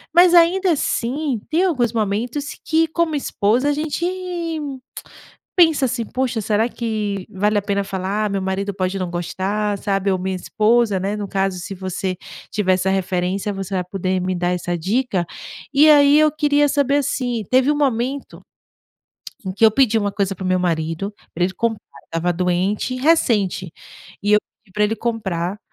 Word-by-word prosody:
Mas 355 Hz, 0 st, +7 dB
ainda 355 Hz, +2 st, +5 dB
assim 270 Hz, -1 st, -1 dB
tem 330 Hz, +4 st, +2 dB
alguns 250 Hz, -, +1 dB
momentos 230 Hz, +7 st, -2 dB
que, 325 Hz, 0 st, +2 dB
como 320 Hz, -2 st, 0 dB
esposa, 245 Hz, 0 st, +1 dB
a 290 Hz, -, +2 dB
gente 300 Hz, +2 st, -2 dB, 1.5 s
pensa 320 Hz, -5 st, +5 dB
assim: 240 Hz, -2 st, -2 dB
Poxa, 255 Hz, -1 st, -2 dB
será 215 Hz, +3 st, +1 dB
que 210 Hz, -5 st, -3 dB
vale 205 Hz, +2 st, +1 dB
a -, -, +2 dB
pena 200 Hz, 0 st, -1 dB
falar? 195 Hz, +2 st, -2 dB
Meu 195 Hz, -1 st, -1 dB
marido 190 Hz, +1 st, -2 dB
pode 185 Hz, 0 st, -2 dB
não 185 Hz, -2 st, -2 dB
gostar, 195 Hz, +4 st, -2 dB
sabe, 195 Hz, -1 st, 0 dB
ou 185 Hz, -, 0 dB
minha 190 Hz, +1 st, -2 dB
esposa, 215 Hz, +3 st, +2 dB
né, 200 Hz, +3 st, -2 dB
no 205 Hz, -, -4 dB
caso, 195 Hz, -1 st, -1 dB
se 195 Hz, +3 st, -6 dB
você 185 Hz, 0 st, -3 dB, 0.4 s
tiver 190 Hz, -3 st, +2 dB
essa 185 Hz, +1 st, 0 dB
referência, 190 Hz, +1 st, -1 dB
você 195 Hz, 0 st, -5 dB
vai 180 Hz, -, 0 dB
poder 185 Hz, 0 st, -2 dB
me 185 Hz, 0 st, -1 dB
dar 175 Hz, 0 st, 0 dB
essa 175 Hz, 0 st, -2 dB
dica. 195 Hz, +1 st, 0 dB, 0.5 s
E 300 Hz, +3 st, +6 dB
aí, 290 Hz, 0 st, +7 dB
eu 310 Hz, -1 st, +4 dB
queria 290 Hz, -1 st, +2 dB
saber 280 Hz, 0 st, +2 dB
assim, 245 Hz, -5 st, -1 dB
teve 260 Hz, +3 st, +4 dB
um 295 Hz, -, 0 dB
momento 270 Hz, 0 st, -1 dB, 1.0 s
em 190 Hz, -, -3 dB
que 205 Hz, +4 st, +2 dB
eu 220 Hz, -, +6 dB
pedi 225 Hz, -2 st, +3 dB
uma 205 Hz, -1 st, 0 dB
coisa 195 Hz, -1 st, -1 dB
pro 190 Hz, -, -8 dB
meu 185 Hz, 0 st, +2 dB
marido, 165 Hz, +2 st, -1 dB, 0.2 s
pra 175 Hz, -, +1 dB
ele 185 Hz, -, -1 dB
comprar. 225 Hz, 0 st, -1 dB, 0.2 s
Eu -, -, -32 dB
estava 175 Hz, +1 st, +1 dB
doente, 180 Hz, +7 st, 0 dB
e 255 Hz, -, -4 dB
recente. 215 Hz, -, +2 dB, 0.5 s
E 205 Hz, +1 st, +1 dB
eu 210 Hz, -, +7 dB, 0.3 s
pedi 195 Hz, -, -25 dB
pra 210 Hz, +1 st, +2 dB
ele 220 Hz, +2 st, 0 dB
comprar, 200 Hz, -5 st, -2 dB
210 Hz, 175 wpm, -20 LUFS, 190-260 Hz, 1.5 s, Mas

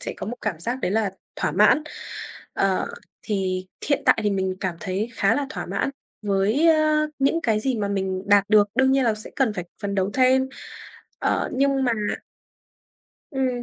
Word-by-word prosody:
sẽ -, -, -3 dB
có 185 Hz, -, -5 dB
một 240 Hz, +4 st, -4 dB
cảm 200 Hz, -7 st, -2 dB
giác 240 Hz, +8 st, -1 dB
đấy -, -, 0 dB
là 210 Hz, -1 st, +1 dB, 0.3 s
thỏa -, -, -1 dB
mãn. 305 Hz, -, +5 dB, 0.7 s
Ờ, 195 Hz, -1 st, +1 dB, 0.4 s
thì 185 Hz, -3 st, -2 dB, 0.2 s
hiện 285 Hz, -, +2 dB
tại -, -, +5 dB
thì 210 Hz, -, +1 dB
mình 190 Hz, -1 st, -1 dB
cảm 180 Hz, -3 st, -2 dB
thấy 200 Hz, +2 st, -2 dB
khá 200 Hz, +3 st, +3 dB
là 285 Hz, -1 st, -1 dB
thỏa 180 Hz, -, -5 dB
mãn 195 Hz, +8 st, -1 dB, 0.3 s
với, 205 Hz, +9 st, +2 dB
ơ, 310 Hz, -1 st, +3 dB
những 275 Hz, +5 st, +2 dB
cái 220 Hz, -5 st, +2 dB
gì 260 Hz, +2 st, 0 dB
mà 205 Hz, -2 st, -1 dB
mình 190 Hz, -2 st, -2 dB
đạt 205 Hz, -1 st, +6 dB
được, 210 Hz, -1 st, +5 dB
đương 265 Hz, +2 st, +4 dB
nhiên 270 Hz, -1 st, +3 dB
là 225 Hz, -2 st, +2 dB
sẽ 215 Hz, +1 st, -6 dB
cần 260 Hz, -6 st, +2 dB
phải 180 Hz, -4 st, -4 dB, 0.2 s
phấn 200 Hz, -1 st, -2 dB
đấu 190 Hz, 0 st, 0 dB
thêm. 260 Hz, 0 st, +4 dB, 0.7 s
Ờ, -, -, 0 dB
nhưng 275 Hz, +1 st, +2 dB
mà 245 Hz, -, +2 dB, 1.4 s
Ừm, 265 Hz, -2 st, 0 dB
215 Hz, 190 wpm, -24 LUFS, 195-265 Hz, 1.4 s, đạt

